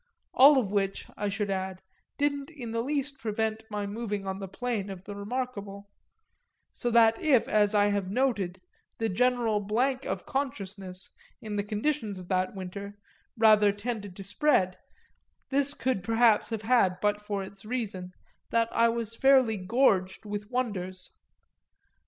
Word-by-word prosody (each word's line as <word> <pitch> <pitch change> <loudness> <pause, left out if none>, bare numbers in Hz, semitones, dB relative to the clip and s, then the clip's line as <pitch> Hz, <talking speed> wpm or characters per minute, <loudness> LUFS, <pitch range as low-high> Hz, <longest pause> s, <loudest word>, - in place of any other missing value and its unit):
All 280 +2 +8
of 215 -7 +1
which, 195 -1 -1
I 205 0 -2
should 200 0 -2
add, 190 -1 -3 0.3
didn't 285 0 0
in 260 -8 -7
the 230 0 -1
least 280 0 -2
prevent 220 -1 -2
my 210 -1 -3
moving 205 -1 -4
on 190 0 -3
the 195 - -5
plane 210 0 -3
of 190 -2 -8
the 205 - -7
remarkable; 200 -2 -5 0.8
so 240 - -2
that 225 -1 +5
if, 270 -7 +4
as 210 0 +3
I 205 0 +4
have 200 -2 -1
noted, 205 -6 0 0.4
the 225 0 0
general 240 0 +2
blank 255 +6 0
of - - -3
consciousness, 195 -8 -4 0.3
in 215 -1 -6
the 205 - 0
conditions 215 0 -2
of 180 -1 -10
that 185 +1 0
winter, 200 +2 -7 0.4
rather 215 -2 +6
tended 205 -2 -5
to 195 - -8
spread, 200 -2 +2 0.8
this 280 +1 +2
could 255 -7 -1
perhaps 225 0 +3
have 225 -2 -3
but - - -10 0.5
had - - -17
for 205 -1 -3
its 195 +1 -10
best - - -16
reason 205 -6 -4 0.4
that 230 0 +2
I 230 0 +4
was 230 -1 -2
fairly 260 -4 +4
gorged 190 -2 +1
with 205 0 -5
wonders. 185 -7 -3
210 Hz, 160 wpm, -28 LUFS, 195-245 Hz, 0.8 s, All